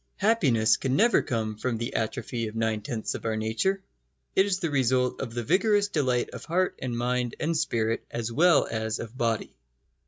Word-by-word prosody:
Happiness 140 - +3
can 130 -1 -1
never 230 +7 +4
come 110 -3 -2
from 120 +1 -2
the 115 +1 -4
atrophy 115 +1 -2
of 110 - -8
nine 110 -1 0
tenths 110 0 -3
of - - -6
our 110 -1 -1
nature. 115 - 0 0.5
It 190 - +4
is 190 -2 +1
the 170 -4 -2
result 130 -2 +1
of 125 - -4
the 120 - -2
vigorous 205 - +2
delight 130 -8 0
of - - -8
heart 185 +3 +1
and 120 -2 -3
mind 125 0 -1
and 165 +2 0
spirit 115 -8 0
as 115 -1 -3
well 170 +5 +4
as 110 0 -2
of 115 +1 -8
body. 115 -3 -1
125 Hz, 190 wpm, -27 LUFS, 115-165 Hz, 0.5 s, never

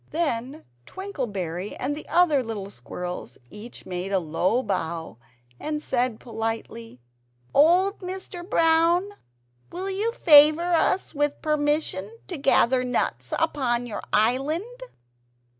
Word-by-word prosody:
Then 285 -3 -2 0.2
Twinkleberry 205 - -4
and 280 +3 -2
the 300 - -9
other 330 -6 +4
little 210 -4 -6
squirrels 175 0 -7
each 215 +3 -10
made 180 +1 -4
a 195 - +3
low 180 +8 0
bow, 160 - -3 0.4
and 300 0 -3
said 250 -5 -1
politely 225 - -5 0.5
"Old 360 +7 +4
Mr. 370 -1 -6
Brown, 335 +1 +3 0.6
will 375 +3 -3
you 415 +4 0
favour 310 0 +6
us 340 +2 +1
with 290 -1 0
permission 295 - 0
to 355 - -3
gather 260 -2 +3
nuts 250 0 -2
upon 245 -4 0
your 230 - -5
island?" 305 - 0
270 Hz, 115 wpm, -25 LUFS, 215-335 Hz, 0.6 s, favour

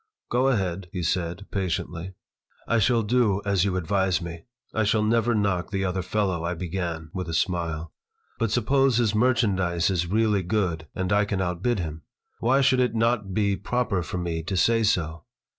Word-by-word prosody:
"Go 125 +2 +3
ahead," 95 -7 -1
he 90 -2 -3
said, 85 +3 -1
patiently 90 -1 -3 0.5
"I 115 - +2
shall 115 +1 +3
do 105 -3 +2
as 100 -2 +2
you 95 -2 0
advise 95 0 +1
me. 85 -2 -7 0.3
I 110 - +1
shall 110 +1 +2
never 115 +1 +2
knock 100 -5 0
the 95 -1 -1
other 95 0 -1
fellow," 95 -2 -1
I 85 +1 -1
began, 85 -2 -4
with 90 -3 -4
a 85 - -2
smile. 85 -2 -1 0.5
"But 115 - +1
suppose 130 +3 +2
his 115 -4 +2
merchandise 100 -7 +2
is 90 -2 0
really 105 +1 +2
good, 90 -4 -1
and 95 +1 -1
I 105 +1 +3
can 100 -2 -2
outbid 95 +6 0
him. 80 -3 -4 0.4
Why 130 +4 +3
should 135 -1 +4
it 125 -3 +1
not 115 -3 +1
be 100 -2 +2
proper 115 0 -1
for 85 - -5
me 85 -2 -2
to 95 +4 -3
say 115 +6 +3
so? 85 -7 0
95 Hz, 180 wpm, -25 LUFS, 85-110 Hz, 0.5 s, should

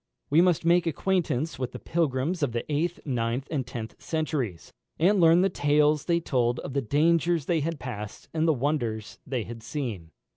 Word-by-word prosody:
We 155 +3 +6
must 175 -3 +2
make 170 0 +4
acquaintance 165 -3 0
with 130 -2 -3
the - - -5
pilgrims 160 +1 -1
of 140 -5 0
the 120 - -2
eighth, 170 +4 -1
ninth, 125 0 -1
and 135 -6 -2
tenth 115 -3 -7
centuries, 145 - -3 0.2
and 190 +4 +3
learn 165 +1 +6
the 190 - +4
tales 150 -2 +2
they 170 -1 +2
told 125 -6 0
of 135 - -6
the 140 - +1
dangers 165 +4 +2
they 170 -2 +1
had 160 0 -2
passed 105 -5 -7
and 160 0 +1
the - - +5
wonders 120 -6 -2
they 130 -4 -1
had 115 +1 -8
seen. 110 - -5
145 Hz, 185 wpm, -27 LUFS, 120-165 Hz, 0.2 s, We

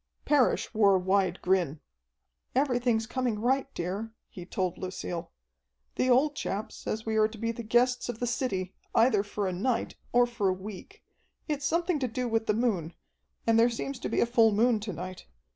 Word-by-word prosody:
Parrish 285 -6 +2
wore 205 -3 +5
a - - +3
wide 190 -1 +1
grin. 180 -5 +1 0.8
"Everything's 245 -4 +2
coming 245 -2 -1
right, 265 +5 0
dear," 195 +6 -3 0.2
he 180 -1 -9
told 185 -2 -2
Lucille. 180 -2 -5 0.6
"The 255 - 0
old 280 +4 +4
chap 205 -4 -3
says 220 +1 -5
we 220 -1 0
are 215 0 +5
to 220 +1 -11
be 230 +1 -1
the 230 - -6
guests 245 +3 +2
of 240 - -3
the 245 - 0
city 200 -7 -2 0.2
either 225 -3 +5
for 205 0 -3
a 185 - -2
night 230 +6 -1 0.2
or 245 0 +5
for 235 -5 0
a - - +2
week. 205 - -9 0.4
It's 290 -2 -2
something 340 0 +1
to 260 - 0
do 250 +2 -2
with 225 -1 0
the 210 - +2
moon, 195 -9 0 0.5
and 225 0 +4
there 235 +1 +5
seems 255 +3 -4
to - - -3
be - - +1
a - - +5
full 230 -2 +4
moon 225 +2 +3
to 210 0 -5
night. 180 +2 -7
225 Hz, 195 wpm, -29 LUFS, 195-245 Hz, 0.8 s, wore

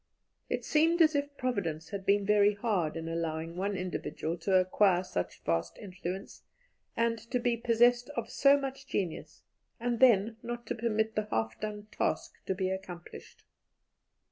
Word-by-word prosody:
It - - -2
seemed 325 +3 +3
as 310 0 +4
if 285 0 -2
Providence 175 - -2
had 195 -2 -6
been 200 0 +3
very 205 0 +4
hard 200 -8 0
in 165 0 -5
allowing 165 0 -3
one 195 +2 -1
individual 175 -2 -3
to 190 +3 +1
acquire 185 0 +4
such 90 - -4
vast 85 0 -1
influence, 185 0 -6 0.6
and 230 0 +1
to 250 - +1
be 240 -1 +1
possessed 240 +2 +3
of 230 -1 -2
so 280 0 +5
much 270 0 -6
genius, 180 -10 -4 0.4
and 240 0 -1
then 225 -3 +5
not 240 0 -5
to - - -2
permit 220 -1 0
the 215 0 -1
half 110 0 -1
done 210 -1 -5
task - - -2
to 190 - 0
be 185 0 -1
accomplished. 180 -2 -8
205 Hz, 160 wpm, -31 LUFS, 180-235 Hz, 0.6 s, so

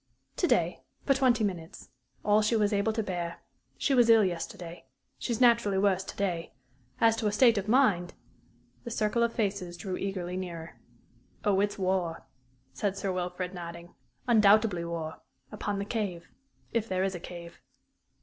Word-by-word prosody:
"To - - +2
day, - - +1 0.2
for 275 - +5
twenty 255 -4 +3
minutes 175 -9 -4 0.4
all 210 +1 +5
she 215 +2 +2
was 210 -1 +2
able 205 +2 +2
to 220 0 -1
bear. 175 -3 -4 0.4
She 280 - +1
was 240 -3 +5
ill 225 -2 +7
yesterday. 175 -1 -5 0.3
She - - -3
is 230 - -1
naturally 235 -5 +4
worse 190 -1 +2
to - - -8
day. 180 -4 -2 0.5
As 225 -1 +5
to 220 - 0
her - - +1
state 230 0 +5
of 200 - -6
mind 210 -8 +3 0.3
" 120 +1 -35
The - - -6
circle 220 0 0
of 235 0 +3
faces 195 -6 -2
drew 185 +2 -4
eagerly 185 -2 -3
nearer. 170 -3 -7 0.7
"Oh, 200 -2 +3
it's 205 0 0
war," 185 -3 -1 0.5
said 200 -2 -2
Sir 195 -1 -2
Wilfrid, 180 0 -3
nodding 170 -1 -8 0.3
"undoubtedly 215 -5 +5
war 165 -2 -5 0.3
upon 205 -1 -3
the 200 - -2
Cave 200 -6 -3 0.4
if 230 -1 0
there 185 0 0
is 190 0 0
a 175 - -5
Cave." 170 0 -10
195 Hz, 170 wpm, -29 LUFS, 175-215 Hz, 0.7 s, ill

